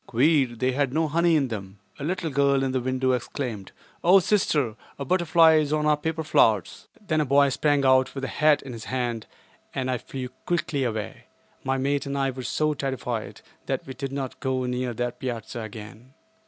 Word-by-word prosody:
Queer: 130 0 +3
they 130 +3 0
had 135 0 0
no 160 +3 +1
honey 170 +2 +3
in 140 -4 +1
them. 100 -3 -6 0.2
A - - -5
little 175 0 -2
girl 140 0 +2
in 135 - 0
the 130 -1 0
window 130 +1 0
exclaimed, 120 -4 -4 0.3
"Oh, 180 +3 +7
sister! 150 - +1 0.2
a 140 - -5
butterfly 165 -1 +5
is 150 -2 +1
on 155 0 +1
our 150 0 +4
paper 160 +2 -3
flowers." 110 - +2
Then 160 -7 0
a - - +3
boy 140 +1 +4
sprang 145 0 +1
out 130 0 +4
with 135 - -5
a - - -1
hat 150 +1 +3
in 130 - -8
his 115 -2 -8
hand 120 -3 -3 0.5
and 130 -1 -1
I 125 - -1
flew 130 +1 -6 0.2
quickly 155 -5 0
away. 110 -3 -4 0.4
My 135 0 0
mate 140 +1 0
and 140 0 -2
I 135 -1 +1
were 130 0 -7
so 155 +4 0
terrified 130 -5 -4 0.3
that - - -2
we 130 - -7
did 135 0 -5
not 135 -2 -5
go 130 -1 -1
near 125 -1 -2
that 120 +1 -3
piazza 120 -1 -5
again. 110 +3 -10
135 Hz, 200 wpm, -25 LUFS, 125-150 Hz, 0.5 s, Oh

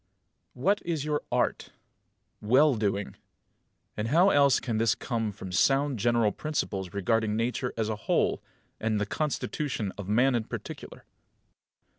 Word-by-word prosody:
5. - - -12
What 200 +4 +3
is 160 -4 -2
your 150 -1 0
art? - - -1 0.7
Well 130 +7 +4
doing. 105 -3 -2 0.8
And 105 +1 -2
how 175 +9 +4
else 140 -2 +4
can 115 -4 -2
this 110 -2 +3
come 115 0 -2
than 105 - -2
from 95 -2 -9
sound 135 +6 +2
general 115 -1 +2
principles 100 - -3
regarding 105 +2 0
Nature 120 +2 -1
as 110 -1 0
a 110 - -1
whole, - - 0 0.4
and 110 -1 0
the 105 - 0
constitution 130 -2 -2
of 100 -1 -6
man 125 +5 +3
in 115 -2 0
particular? - - -8
115 Hz, 150 wpm, -28 LUFS, 105-140 Hz, 0.8 s, Well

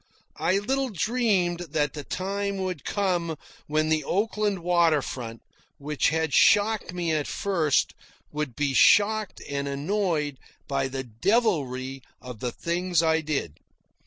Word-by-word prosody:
I 190 - +2
little 265 +6 0
dreamed 200 -4 +1
that 150 -4 -1
the 150 - -6
time 200 +4 -3
would 185 -5 -4
come 175 -5 -1 0.3
when 155 +1 +1
the 155 -1 +2
Oakland 205 +1 -1
water 170 -4 +3
front, 115 -3 -6 0.3
which 150 0 0
had 160 -1 -1
shocked 210 -2 +4
me 175 -2 -2
at 155 -2 0
first 165 -8 +1 0.4
would 150 -5 -3
be 145 -2 0
shocked 210 +6 +4
and 140 0 -3
annoyed 150 -1 -1 0.3
by 135 -1 0
the 135 0 -4
devilry 135 - 0 0.2
of 125 -3 -9
the 125 +1 -2
things 175 +2 0
I 160 0 +3
did. 145 - -3
160 Hz, 135 wpm, -26 LUFS, 140-195 Hz, 0.4 s, shocked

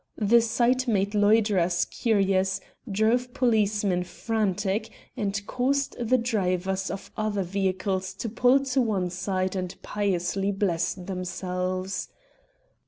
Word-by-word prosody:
The 230 +2 +5
sight 240 +3 +1
made 200 -2 +1
loiterers 205 -5 +3
curious, 195 -4 +1 0.3
drove 235 +5 +1
policemen 210 -6 +2
frantic, 205 +2 -1 0.3
and 205 -3 -1
caused 270 +4 0
the 240 +2 +2
drivers 190 -5 -1
of 195 +2 -6
other 215 -2 -1
vehicles 190 0 -1
to - - -4
pull 250 +5 +3
to 265 0 +1
one 195 -6 0
side 185 +1 -2
and 185 -1 -3
piously 195 -1 -1
bless 190 -4 0
themselves. 185 0 -3
200 Hz, 110 wpm, -26 LUFS, 185-225 Hz, 0.3 s, The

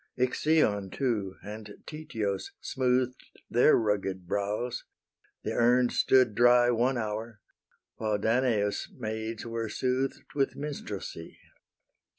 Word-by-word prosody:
Ixion 125 -6 +2
too 105 -6 -1
and 105 0 -8
Tityos 110 -11 -3
smooth'd 130 -1 0 0.3
Their 120 +6 +6
rugged 100 -4 -1
brows: 105 +6 -2 0.6
the - - -2
urn 120 +1 +4
stood 130 -4 +4
dry 120 +2 +5
One 120 +2 +2
hour, 110 0 -4 0.6
while 110 -2 0
Danaus' 110 -2 +1
maids 110 -1 -4
were 115 -1 -3
sooth'd 130 +3 -1
With 140 -2 0
minstrelsy. 105 - -6
115 Hz, 105 wpm, -29 LUFS, 105-125 Hz, 0.6 s, Their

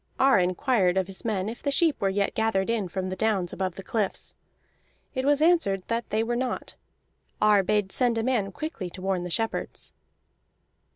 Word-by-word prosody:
Ar 270 -6 +5
inquired 185 +1 +2
of 190 - +2
his 190 0 -6
men 205 -4 -1
if 225 +2 -6
the 285 - -1
sheep 310 +1 +2
were 195 - +2
yet 200 +1 0
gathered 220 -2 +1
in 220 -5 0
from 185 +1 -3
the 185 - -3
downs 195 -3 0
above 185 -2 -2
the 195 - -8
cliffs. 210 -1 -2 0.8
It 260 -1 -2
was 290 +1 +3
answered 315 - +3
that 230 0 -2
they 220 +1 +1
were 240 +1 -1
not. 255 +1 -3 0.6
Ar 210 -1 +5
bade 200 0 0
send 245 -3 +1
a 225 - 0
man 225 -6 0
quickly 225 - -5
to 185 - -10
warn 190 -2 0
the 180 - -5
shepherds. 225 +6 -3
210 Hz, 190 wpm, -26 LUFS, 190-240 Hz, 0.8 s, Ar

